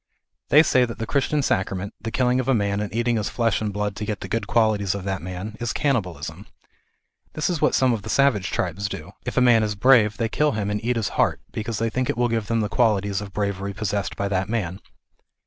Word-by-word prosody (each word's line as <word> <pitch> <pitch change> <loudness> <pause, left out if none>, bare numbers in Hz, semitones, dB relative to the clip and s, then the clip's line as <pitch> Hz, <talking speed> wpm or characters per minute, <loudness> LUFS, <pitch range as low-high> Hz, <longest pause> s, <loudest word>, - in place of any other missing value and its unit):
They 150 +2 +7
say 130 -5 +3
that 115 - -7
the 115 - -3
Christian 140 +3 0
sacrament, 95 -2 -1
the 115 - -4
killing 125 +1 +1
of 130 - -2
a 135 - +3
man 100 -2 0
and 105 -1 -3
eating 120 +1 +1
his 105 - -1
flesh 115 -2 0
and 105 -1 -1
blood 105 0 -2
to 105 - -4
get 105 -1 -4
the - - -5
good 115 -3 -2
qualities 105 -4 +2
of 100 - -5
that 95 -1 -3
man, 90 +4 -6
is 120 -1 -2
cannibalism. 115 - -2 0.9
This 155 +3 -1
is 170 - -2
what - - +3
some 130 -2 +3
of 110 - -2
the 110 - -8
savage 110 -7 +2
tribes 95 +3 -2
do; - - -7 0.2
if - - -4
a - - +5
man 120 -3 +5
is 105 -1 -1
brave 110 -1 +4
they 115 - 0
kill 150 +6 +1
him 105 -1 -2
and 105 +1 -3
eat 125 +1 0
his 110 -3 -1
heart, - - +2
because 110 0 -4
they 115 0 -1
think 130 +1 -1
it - - -1
will 120 0 +2
give 115 -2 -1
them 115 0 +1
the 105 - 0
qualities 100 -4 +1
of 100 -1 -8
bravery 100 0 -2
possessed 100 -1 -2
by 100 - -2
that 95 0 -1
man. 100 -5 -2
110 Hz, 245 wpm, -23 LUFS, 100-120 Hz, 0.9 s, They